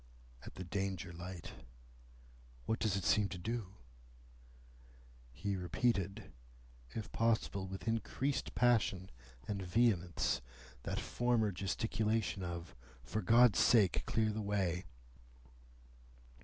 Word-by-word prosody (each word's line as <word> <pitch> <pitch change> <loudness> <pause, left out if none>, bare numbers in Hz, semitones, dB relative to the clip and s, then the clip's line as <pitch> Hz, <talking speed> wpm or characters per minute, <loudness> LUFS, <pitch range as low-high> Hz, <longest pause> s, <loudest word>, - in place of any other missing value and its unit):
"At - - -10
the 95 - -5
Danger 95 0 -3
light." 85 0 -7 1.1
"What 110 - 0
does 105 -3 +1
it 95 - -2
seem 105 +1 +3
to 95 - -5
do?" 105 +1 -4 1.6
He 100 +10 -2
repeated, 100 +2 -1 0.6
if 110 -2 -6
possible 110 -4 +1
with 95 +4 -7
increased 125 +5 -1
passion 110 -6 +2 0.4
and 100 -2 -2
vehemence, 90 -2 +1 0.4
that - - -3
former 120 -3 +1
gesticulation 105 +2 -1
of, 85 -1 -5 0.3
"For 105 +11 -2
God's 120 0 +6
sake, 105 -7 +5
clear 110 -1 +2
the 110 +1 -3
way!" 95 -4 0
100 Hz, 105 wpm, -36 LUFS, 90-115 Hz, 1.6 s, God's